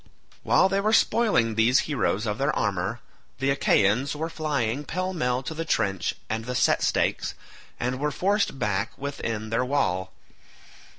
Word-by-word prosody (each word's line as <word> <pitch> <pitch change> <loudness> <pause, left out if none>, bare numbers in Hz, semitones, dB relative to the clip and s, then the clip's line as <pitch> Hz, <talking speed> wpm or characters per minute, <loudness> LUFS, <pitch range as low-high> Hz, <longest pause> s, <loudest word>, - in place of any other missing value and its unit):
While 190 - +4
they 195 0 0
were 215 +2 +1
spoiling 215 - +3
these 115 +4 +4
heroes 120 -7 -1
of 105 0 -2
their 140 +2 +2
armour, 100 +3 -1 0.4
the 135 +1 +1
Achaeans 130 0 +2
were 160 +2 -3
flying 140 -5 -1
pell 185 +5 -3
mell 125 -6 -1
to 125 - -5
the 165 +1 -3
trench 95 - 0
and 110 +1 -3
the 125 +1 -4
set - - +3
stakes, - - 0 0.4
and 125 +1 -2
were 150 +1 0
forced 195 -1 0
back 105 -1 -1
within 115 -6 -4
their 115 +2 +1
wall. 95 -9 0
125 Hz, 160 wpm, -25 LUFS, 110-150 Hz, 0.4 s, While